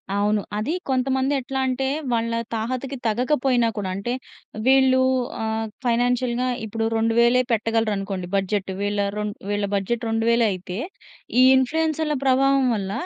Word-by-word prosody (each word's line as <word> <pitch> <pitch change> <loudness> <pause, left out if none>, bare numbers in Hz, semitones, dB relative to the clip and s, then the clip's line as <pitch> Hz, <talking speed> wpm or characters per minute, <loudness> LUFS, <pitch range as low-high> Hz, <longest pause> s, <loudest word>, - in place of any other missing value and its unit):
అవును. 205 +1 +1 0.2
అదీ 235 +10 -1 0.2
కొంతమంది 265 +1 +1
ఎట్లా 265 +1 -4
అంటే, 260 +1 -1 0.2
వాళ్ళ 230 0 0 0.2
తాహతకి 255 +4 -3
తగకపోయినా 250 +1 +1
కూడా 190 -2 -2
అంటే, 240 +5 -3 0.5
వీళ్ళూ 260 -1 +5 0.4
ఆహ్, 220 0 -1 0.2
ఫైనాన్షియల్‌గా 245 +1 +1 0.2
ఇప్పుడు 225 +1 -2
2,000 235 +2 +3
పెట్టగలరు 225 -1 +1
అనుకోండి 195 -2 -4
బడ్జెట్. 195 0 -1
వీళ్ళ 205 0 -1 0.2
రొన్ 210 -1 -2 0.2
వీళ్ళ 205 0 0
బడ్జెట్ 230 +4 -1
2,000 230 +1 +2
అయితే 185 +1 -6 0.6
ఈ - - +8
ఇన్‌ఫ్లూయెన్సర్‌ల 310 +3 +1
ప్రభావం 270 0 +3
వల్ల, 195 -2 -3
235 Hz, 130 wpm, -23 LUFS, 210-260 Hz, 0.6 s, ఈ